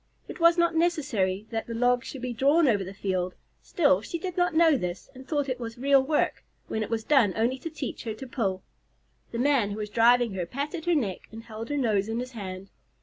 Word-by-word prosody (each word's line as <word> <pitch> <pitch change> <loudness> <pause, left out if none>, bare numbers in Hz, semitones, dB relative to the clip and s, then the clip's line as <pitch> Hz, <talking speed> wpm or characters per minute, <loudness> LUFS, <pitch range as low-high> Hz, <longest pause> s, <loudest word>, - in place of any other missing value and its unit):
It - - -9
was 335 +1 +5
not 340 0 +3
necessary 265 - 0
that 225 -1 -3
the 230 - -5
log 245 +1 +2
should 265 -3 -8
be 250 -1 -2
drawn 285 +7 +3
over 205 -5 +2
the 190 - -7
field; 185 -2 -2 0.3
still, 285 - +2
she 335 - -5
did 360 +1 -5
not 355 -3 +1
know 325 -2 +5
this, 180 -7 -4
and 260 0 -12
thought 290 -3 0
it 255 -1 -3
was 230 -1 -6
real 275 +2 +4
work, 295 +3 0 0.2
when 220 - -2
it 215 - -3
was 225 -1 -1
done 235 -8 +4
only 240 +4 0
to 330 - -5
teach 295 -5 -6
her 220 -2 -3
to 265 - -8
pull. 195 -7 -2 0.7
The 230 - -4
man 255 -4 +2
who 205 - -5
was 210 -1 -5
driving 235 0 +4
her 180 -3 -3
patted 295 - -4
her 350 -1 +3
neck 210 - -2
and 225 +1 -9
held 225 0 -8
her 290 - -1
nose 215 -6 +1
in 225 - -2
his 250 +1 -4
hand. 195 -4 -7
245 Hz, 235 wpm, -27 LUFS, 210-290 Hz, 0.7 s, was